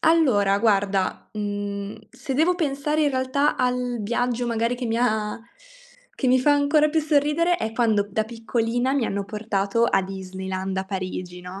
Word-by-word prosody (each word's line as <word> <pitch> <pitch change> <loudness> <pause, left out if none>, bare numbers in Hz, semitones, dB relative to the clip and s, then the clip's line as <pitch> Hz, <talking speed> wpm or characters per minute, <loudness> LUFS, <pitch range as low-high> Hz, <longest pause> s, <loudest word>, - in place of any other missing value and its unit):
allora, 235 -12 +3
guarda, 200 -3 +1
mhmm, 205 -1 -4
se 260 +2 -5
devo 325 +6 +3
pensare, 300 -2 0
in 290 - +3
realtà, 260 +3 +1
al 250 -1 0
viaggio, 240 +3 -1
magari, 230 +1 0
che 245 0 -4
mi 225 0 -1
ha 215 -2 0 0.8
che 260 - 0
mi 255 - +5
fa 290 +3 +4
ancora 290 +1 +3
più 315 +1 +1
sorridere, 305 +3 +2
è 220 -5 -3
quando, 220 -3 +2
da 215 +2 0
piccolina, 235 +2 -1
mi 275 -3 +1
hanno 200 -2 -2
portato 210 +1 -1
a 195 - +3
Disneyland 190 0 -5
a 190 - -1
Parigi, 185 -2 -5
no? 180 +2 -8
230 Hz, 165 wpm, -24 LUFS, 200-270 Hz, 0.8 s, mi